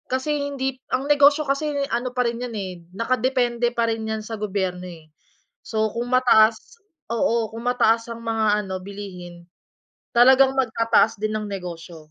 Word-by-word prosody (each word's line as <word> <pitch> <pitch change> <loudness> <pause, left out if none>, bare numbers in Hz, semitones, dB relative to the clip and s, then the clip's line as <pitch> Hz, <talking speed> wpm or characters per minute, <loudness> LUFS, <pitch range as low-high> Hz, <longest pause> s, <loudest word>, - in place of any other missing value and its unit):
Kasi 285 +2 -1
hindi 265 -2 -3
ang 260 +2 -1
negosyo 290 +1 +4
kasi 280 +2 -1 0.2
ano 245 +2 -2
pa 250 -1 +1
rin 235 0 -2
'yan 245 -2 -5
eh, 190 -2 -4 0.2
nakadepende 245 0 0
pa 235 - +2
rin 225 -1 -4
'yan 220 0 -3
sa 225 -1 -6
gobyerno 190 -3 -3
eh. 160 -3 -13 0.5
So 220 -2 -1
kung 240 +1 -3
mataas 245 - +3 0.3
oo. 230 -1 0
Kung 230 +1 -7
mataas 230 -2 +2
ang 230 0 -7
mga 220 -2 +1
ano 190 -1 -4
bilihin, 185 -3 -9 0.7
talagang 260 +2 +6
magtataas 230 -2 +2
din 215 0 -1
ang 215 - -5
negosyo. 170 -4 -8
230 Hz, 160 wpm, -23 LUFS, 205-255 Hz, 0.7 s, talagang